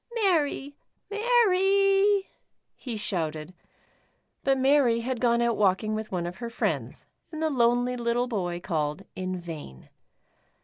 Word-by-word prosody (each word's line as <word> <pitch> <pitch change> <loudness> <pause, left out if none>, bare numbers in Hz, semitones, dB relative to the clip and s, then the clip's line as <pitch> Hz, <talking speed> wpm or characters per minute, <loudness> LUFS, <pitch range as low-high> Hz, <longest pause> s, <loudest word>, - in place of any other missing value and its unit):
*' - - -9
Mary, 310 -9 +1 0.4
Mary," 395 -3 +3 0.5
he 240 -4 -6
shouted, 160 -5 -3 0.9
but 270 -1 +2
Mary 260 -3 +3
had 245 0 -3
gone 235 -1 +3
out 235 -1 +1
walking 210 +2 +2
with 215 0 -4
one 175 -2 -2
of 175 +1 -6
her 235 -1 -5
friends, 230 - -3 0.3
and 310 - -6
the 315 -1 0
lonely 245 -1 +2
little 240 +1 0
boy 180 -7 -2
called 155 -1 -2
in 185 0 -3
vain. 155 - -9
235 Hz, 135 wpm, -27 LUFS, 185-295 Hz, 0.9 s, Mary